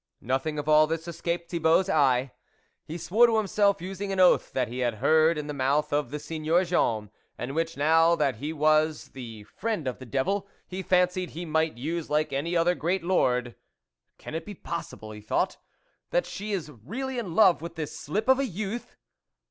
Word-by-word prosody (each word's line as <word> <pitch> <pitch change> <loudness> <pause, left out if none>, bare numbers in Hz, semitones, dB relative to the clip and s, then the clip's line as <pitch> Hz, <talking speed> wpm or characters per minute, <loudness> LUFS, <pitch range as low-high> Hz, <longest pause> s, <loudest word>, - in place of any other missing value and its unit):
Nothing 135 +5 -1
of 145 0 -4
all 155 0 +6
this 165 +1 -3
escaped 170 0 -3
Thibault's 165 +2 +3
eye. 135 -6 +2 0.6
He 160 - -5
swore 220 +8 +4
to 225 -1 +2
himself, 200 -3 +2
using 195 +2 -4
an 190 - -2
oath 180 -1 +4
that 125 -2 0
he 125 +3 -6
had 120 -3 0
heard 155 +7 +3
in 150 - -3
the 150 - -5
mouth 145 +3 0
of 145 -3 0
the 150 - -4
Seigneur 155 +3 0
Jean, 110 - 0 0.3
and 125 +3 -5
which, 165 0 -2
now 165 +3 +4
that 140 -7 0
he 145 +7 -4
was 155 0 +2
the 115 -5 -9
friend 210 - -3
of 125 - -3
the 130 - -10
devil, 195 - -1 0.2
he 185 +1 -5
fancied 180 0 +1
he 175 +2 -6
might 160 -3 0
use 160 +6 -3
like 150 -1 0
any 165 +6 0
other 170 +2 +3
great 175 +2 -1
lord: 125 -9 +1 0.3
" - - -56
Can - - -9
it 160 +1 -3
be 205 +4 -9
possible," 165 -11 -6
he 105 0 -9
thought, 105 - -1 0.3
" - - -45
that - - +1
she 210 +1 -6
is 175 -7 -3
really 240 - -5
in 185 -8 -5
love 190 -7 +5
with 170 0 -7
this 155 -3 -5
slip 210 - -3
of 265 0 +5
a 275 - +1
youth 215 +3 -5
160 Hz, 205 wpm, -27 LUFS, 140-185 Hz, 0.6 s, all